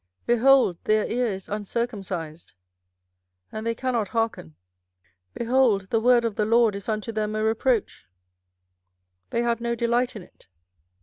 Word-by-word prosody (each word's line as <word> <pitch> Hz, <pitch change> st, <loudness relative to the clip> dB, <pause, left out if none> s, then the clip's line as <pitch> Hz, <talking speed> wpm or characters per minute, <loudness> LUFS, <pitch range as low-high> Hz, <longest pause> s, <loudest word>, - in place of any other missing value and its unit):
behold, 240 Hz, -6 st, +4 dB
their 215 Hz, 0 st, +2 dB
ear 245 Hz, +1 st, 0 dB
is 190 Hz, -1 st, -7 dB
uncircumcised, 200 Hz, -6 st, -4 dB, 1.0 s
and 220 Hz, +1 st, -5 dB
they 230 Hz, -, 0 dB
cannot 240 Hz, -4 st, -1 dB
hearken: 225 Hz, -, -3 dB, 0.8 s
behold, 235 Hz, -5 st, +1 dB
the 225 Hz, -, +3 dB
word 240 Hz, 0 st, +4 dB
of 230 Hz, -, -1 dB
the 215 Hz, -, +2 dB
LORD 230 Hz, -1 st, +3 dB
is 200 Hz, +2 st, -7 dB
unto 215 Hz, +1 st, -2 dB
them 215 Hz, -1 st, -2 dB
a 215 Hz, -, -1 dB
reproach; 225 Hz, +1 st, 0 dB, 1.2 s
they 235 Hz, -, -1 dB
have 235 Hz, -1 st, 0 dB
no 235 Hz, 0 st, -1 dB
delight 240 Hz, +2 st, 0 dB
in 205 Hz, -, -8 dB
it. 170 Hz, -, -22 dB
225 Hz, 140 wpm, -25 LUFS, 210-235 Hz, 1.2 s, behold